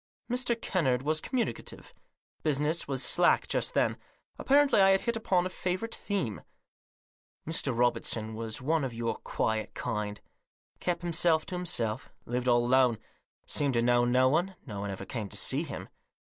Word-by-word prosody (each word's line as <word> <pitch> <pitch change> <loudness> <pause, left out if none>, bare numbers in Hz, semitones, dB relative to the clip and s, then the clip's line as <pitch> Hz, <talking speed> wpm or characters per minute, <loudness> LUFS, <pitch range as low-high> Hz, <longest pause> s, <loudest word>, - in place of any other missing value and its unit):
Mr. 245 -2 0
Kennard 135 - 0
was 155 +1 +1
communicative. 250 -3 -4 0.5
Business 150 +2 +1
was 135 -2 -1
slack 175 +6 +4
just - - 0
then. - - +1 0.4
Apparently 280 -6 +4
I 195 - +6
had 195 0 +4
hit 235 -1 -1
upon 185 -5 +1
a - - -1
favourite 185 +5 -3
theme. 180 - -3 0.5
" - - -41
Mr. 140 -6 -1
Robertson 115 -2 +1
was 115 +2 -5
one 160 +2 +1
of 125 -3 -3
your 115 0 -2
quiet 110 -1 -2
kind. 105 -1 -3 0.6
Kept 175 -1 -2
himself 165 -2 +2
to 185 - -5
himself; 120 -10 -2
lived 125 +1 -2
all 120 -1 +4
alone; 125 -2 +4 0.5
seemed 140 -3 0
to 115 - +2
know 120 0 +4
no 125 +1 +4
one; 175 +7 +1
no 105 -7 -6
one 100 0 -3
ever 95 - -6
came 110 -7 -5
to - - -7
see - - +1
him. - - -6
135 Hz, 165 wpm, -29 LUFS, 120-180 Hz, 0.6 s, I